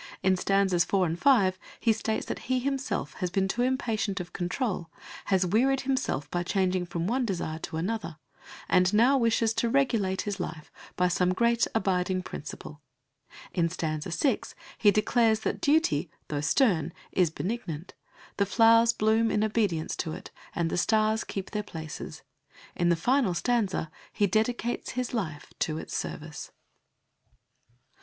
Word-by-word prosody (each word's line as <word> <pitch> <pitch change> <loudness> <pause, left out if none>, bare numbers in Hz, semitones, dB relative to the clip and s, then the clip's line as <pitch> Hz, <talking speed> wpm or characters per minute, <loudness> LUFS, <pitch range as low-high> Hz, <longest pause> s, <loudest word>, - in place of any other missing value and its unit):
In 190 0 +4
stanzas 190 -1 +2
4 190 -1 +1
and 165 0 -2
5 195 -10 +4 0.2
he 230 - +3
states 220 0 -2
that - - -4
he 255 - +3
himself 255 - -2
has 180 - 0
been 190 +2 +1
too 240 - -1
impatient 225 -6 0
of 175 -2 -7
control, 180 -1 -2 0.4
has 190 -2 +2
wearied 255 +8 +2
himself 260 - -1
by 175 - 0
changing 185 0 0
from 170 -1 -3
one 250 +6 +1
desire 170 -7 -3
to 160 - -5
another, 170 -2 -3 0.5
and 180 +2 +3
now 245 +6 +5
wishes 230 -3 +2
to 230 +1 0
regulate 230 -8 +1
his 205 -1 -4
life 160 -3 -6 0.2
by 180 - +2
some 180 +1 +1
great 235 +2 +3
abiding 185 -3 +1
principle. 150 -2 -8 0.7
In 170 -2 +1
stanza 155 -1 -3
6 260 - -1 0.2
he 210 - +6
declares 220 +1 +3
that - - -2
duty, 285 - +2 0.2
though 145 -1 -2
stern, 170 - +2 0.2
is 180 -3 +3
benignant; 180 -2 -5 0.4
the 200 - +2
flowers 230 +2 +5
bloom 220 +1 +2
in 210 - +1
obedience 205 -7 0
to 160 -3 -3
it, - - -9 0.2
and 165 -1 0
the - - 0
stars 215 +1 +2
keep 195 -1 -6
their 210 - -1
places. 160 -6 -8 0.5
In 175 0 +2
the 170 - +4
final 240 +1 +2
stanza 200 -6 0 0.2
he 205 - +1
dedicates 225 +4 -1
his 250 -1 -3
life 160 -11 -4
to 155 -1 -1
its - - -6
service. - - -5
195 Hz, 155 wpm, -28 LUFS, 175-230 Hz, 0.7 s, he